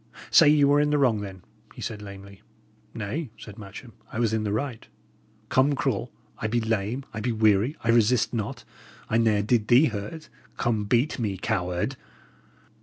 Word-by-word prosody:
"Say - - +7
ye 150 -1 +5
were 145 +1 +5
in 150 - +2
the 150 - +2
wrong, 120 -7 +2
then," 95 -2 -8 0.3
he - - -9
said, 110 -3 -5
lamely. 100 -1 -11 0.5
"Nay," 115 +8 -4
said 105 -1 -11
Matcham, 110 +4 -10 0.2
"I - - -6
was 115 -2 +1
in 110 - +1
the 105 -1 -2
right. 115 +1 -3 0.6
Come, 135 +3 +3
cruel! 125 -3 -1 0.3
I 110 - -1
be 120 +2 +1
lame; 110 +3 -2
I 105 - -4
be 120 +3 -1
weary; 110 +5 +2
I 115 - -2
resist 115 +1 +3
not; 110 -3 -4 0.5
I 115 - +3
ne'er 110 -3 +2
did 110 0 +1
thee 125 +6 +6
hurt; 110 +9 -6 0.3
come, 110 -3 0
beat 125 +7 +1
me 105 -5 -2
coward!" 90 +4 -2
110 Hz, 180 wpm, -26 LUFS, 105-125 Hz, 0.6 s, Say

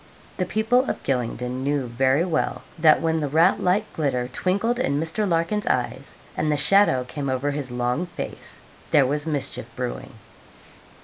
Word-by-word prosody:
The 185 - -1
people 235 +6 +2
of - - -4
Gylingden 125 0 -2
knew 140 -1 0
very 130 +6 +2
well 160 -4 -1 0.2
that, 155 0 +5
when 160 0 +1
the 150 - -1
rat 165 +7 +3
like 195 +4 +1
glitter 130 -5 -1
twinkled 200 - -1
in 140 - 0
Mr. 165 +6 -1
Larkin's 170 +5 0
eyes, 125 -1 -2 0.2
and 155 - 0
the 150 - +1
shadow 150 -4 +4
came 135 +3 -5
over 130 +2 0
his 140 -2 -4
long 125 +7 -1
face, - - -7 0.3
there 145 -3 +5
was 145 +4 -1
mischief 145 -3 -2
brewing. - - -5
150 Hz, 165 wpm, -24 LUFS, 130-180 Hz, 0.3 s, that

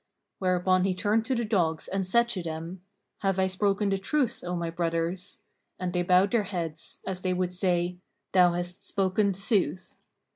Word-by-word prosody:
Whereupon 185 0 +2
he 190 -1 +1
turned 215 +3 +1
to 260 +1 0
the 235 -1 0
dogs 170 -7 0
and 190 -1 -2
said 235 +4 +4
to 190 -6 -1
them, 165 +2 -6 0.4
"Have 195 -2 0
I 190 - +3
spoken 200 +2 +1
the 195 0 0
truth, 250 +3 0
O 180 0 -2
my 170 -1 -2
brothers?" 170 +2 -2 0.4
And 180 -1 -2
they 180 - +1
bowed 180 +2 +4
their 235 - +3
heads, 170 -5 -5
as 185 -1 -4
they 185 -1 0
would 180 0 -1
say, 180 -1 0 0.3
"Thou 180 -2 +5
hast 175 +1 -4
spoken 195 +1 +1
sooth." 195 -1 0
185 Hz, 180 wpm, -28 LUFS, 175-195 Hz, 0.4 s, Thou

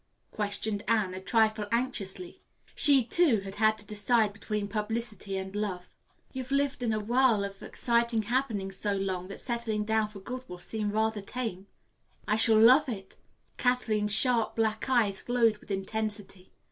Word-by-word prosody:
questioned 205 0 -2
Anne, 210 -4 +1
a 185 - -6
trifle 215 0 +1
anxiously. 205 -7 -2 0.3
She 280 -3 +6
too 245 - +3
had 195 0 -8
had 215 0 +3
to 210 - -6
decide 210 +1 +1
between 205 0 -4
publicity 215 -2 -3
and 190 +1 -6
love. 190 -4 -4 0.4
"You've 260 -1 -6
lived 280 -1 0
in 235 -2 0
a 215 - 0
whirl 235 -1 +2
of 200 0 -7
exciting 235 -2 0
happenings 210 -5 -2
so 205 0 -1
long 190 -2 -3
that 195 - -8
settling 235 -4 -2
down 220 0 +1
for 210 -1 -11
good 250 +6 -7
will 180 - -7
seem 210 +3 -4
rather 220 0 0
tame." 200 -3 -5 0.6
"I 210 - +2
shall 220 0 +5
love 260 +6 +6
it." 195 -5 -7 0.4
Kathleen's 220 -4 +1
sharp 230 +1 +3
black 220 +2 -1
eyes 220 -7 +2
glowed 235 -3 +2
with - - -19
intensity. 205 -1 -4
215 Hz, 160 wpm, -29 LUFS, 200-235 Hz, 0.6 s, She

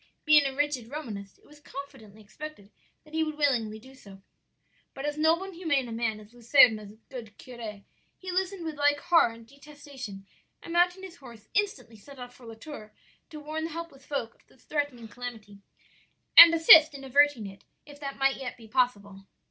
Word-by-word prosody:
Being 300 -2 +5
a 270 - -6
rigid 280 -5 -2
Romanist 215 -9 -8
it - - -28
was 295 0 -18
confidently 225 -8 -11
expected 215 -1 -11 0.3
that 305 - -20
he 320 0 +1
would 310 -1 -4
willingly 240 -7 0
do 260 +5 -16
so. 195 -7 -16 0.7
"But 270 - -6
as 295 0 -2
noble 320 +4 +2
and 385 0 -9
humane 295 -7 -1
a - - -8
man 225 -1 -2
as 215 +2 -17
Luserna's 225 -4 +4
good 225 -6 -10
curé, 225 -5 -9 0.3
he 370 -1 -7
listened 375 -1 -2
with 315 -2 -5
like 290 0 +2
horror 330 -7 +3
and 230 0 -14
detestation, 275 -6 -11 0.4
and 335 - -8
mounting 355 +2 +2
his 370 -3 -10
horse, 235 -5 -15
instantly 265 - -2
set 275 +7 -15
off 245 -1 -10
for 245 - -15
La 225 - -9
Tour 220 -3 -11 0.4
to 310 -2 -9
warn 310 +2 -5
the - - -5
helpless 330 -4 -9
folk 270 -6 -4
of - - -32
the - - -25
threatened 255 -5 -4
calamity, 225 -5 -9 0.8
and 335 0 +12
assist 320 -2 +7
in 275 - -10
averting 280 -3 +2
it, 195 0 -11 0.2
if 290 -1 -14
that 275 -1 -6
might 270 0 +1
yet 265 -2 -7
be 225 -2 -15
possible. 205 -5 -2
270 Hz, 190 wpm, -27 LUFS, 225-305 Hz, 0.8 s, and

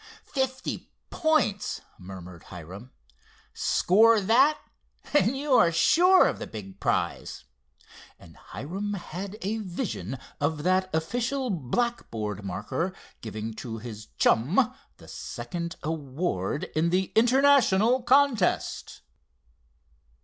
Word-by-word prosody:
"Fifty 260 -1 -2 0.2
points!" 310 - +1 0.2
murmured 90 -2 -10
Hiram. 95 +8 -10 0.6
"Score 220 +4 +4
that 255 +9 +4 0.6
and 270 -3 +3
you 285 0 -1
are 175 -9 +6
sure 350 - +5
of - - -3
the - - -5
big 100 -4 -9
prize," - - -2 0.7
and - - -16
Hiram 190 - -5
had 195 +3 -7
a 215 +4 -1
vision 185 - -4 0.2
of 150 +1 -1
that 185 +1 +2
official 245 +10 -1
blackboard 125 - -2
marker 105 - -3 0.3
giving 110 0 -5
to 115 0 -6
his 110 -1 -9
chum 190 - +3 0.2
the - - -16
second 170 -1 -6
award 150 - -2
in 160 +2 +2
the 185 +1 0
International 250 -2 +4
contest. 250 -5 +1
185 Hz, 105 wpm, -27 LUFS, -, 0.7 s, are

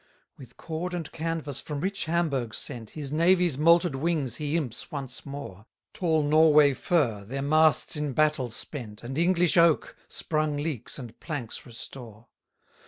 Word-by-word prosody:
143 - - -29
With 125 -1 -16
cord 170 +3 -4
and 165 -4 -5
canvas 160 -3 -3
from 150 -2 -5
rich 195 +5 -2
Hamburgh 155 -8 -1
sent, 115 -3 -7
His 145 -2 -4
navy's 170 -1 +3
molted 170 +1 +4
wings 140 -3 -1
he 150 +2 -1
imps 125 -8 -4
once 140 -2 -6
more: 130 -7 -8 0.3
Tall 160 -4 +1
Norway 150 -1 +6
fir, 130 - 0
their 135 +7 -4
masts 155 +3 +3
in 150 -2 -2
battle 150 -3 +2
spent, 115 -2 -8
And 130 +3 -5
English 175 +1 +3
oak, 170 -2 +4
sprung 155 -2 -1
leaks 145 -6 -3
and 120 -4 -10
planks 140 -10 -5
restore. 115 -1 -10
150 Hz, 155 wpm, -27 LUFS, 130-165 Hz, 0.3 s, Norway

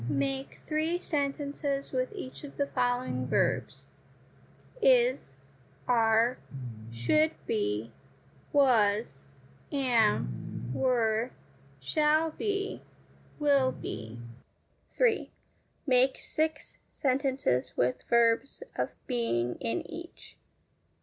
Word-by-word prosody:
Make 135 -1 -2
three 315 +3 0
sentences 280 -3 -2
with 255 -1 -1
each 260 - -7
of 285 - -10
the 280 - +2
following 245 - -1
verbs: - - 0 1.0
Is, 255 - +4 0.6
are, 230 0 +3 0.5
should 305 - +2
be, 115 - -1 0.6
was, 220 - +3 0.4
am, 220 - 0
were, 230 - +1 0.5
shall 305 - +2
be, 400 +3 -2 0.6
will 280 -3 +3
be. 110 - -6 0.7
3. 475 -3 +1 0.6
Make 260 -1 +4
six 315 -2 -3
sentences 265 - 0
with 125 +1 +1
verbs 235 - +3
of - - -1 0.2
being 125 - 0
in 115 +1 -2
each. 340 +2 -9
255 Hz, 85 wpm, -30 LUFS, 205-285 Hz, 1.0 s, Is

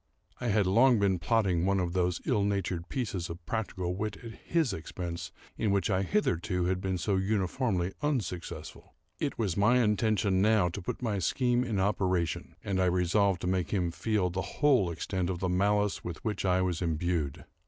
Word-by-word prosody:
I 125 - -3
had 105 -2 +3
long 120 +6 +5
been 100 -3 +2
plotting 95 -6 +1
one 100 +1 +2
of 85 -2 -1
those 90 -2 0
ill 105 -5 +2
natured 95 -4 -1
pieces 95 -9 -3
of 85 0 -8
practical 95 -5 -2
wit 105 +2 -3
at 115 - -7
his 150 - -1
expense 85 0 -5 0.3
in 110 - +1
which 100 +2 +1
I 95 - +2
had 95 - -3
hitherto 90 - +1
been 95 0 -2
so 100 +2 0
uniformly 95 -1 0
unsuccessful. 90 - -4 0.2
It - - -2
was 100 -7 0
my 105 +5 +4
intention, 105 -3 +2
now, 105 -3 +4
to 95 +4 -6
put 90 - -5
my 105 -4 0
scheme 125 +6 +1
in 110 -6 -1
operation, 95 -3 0
and 95 -2 0
I - - +3
resolved 90 +2 +2
to - - -2
make 90 -1 0
him 90 -4 0
feel 100 -1 0
the 95 +2 -2
whole 130 - +2
extent 90 +2 -2
of 90 - -2
the 95 +1 -1
malice 105 +2 +1
with 85 +3 -7
which 105 -3 -2
I 95 0 +3
was 90 -2 -1
imbued. 80 -3 -1
95 Hz, 185 wpm, -30 LUFS, 90-105 Hz, 0.3 s, long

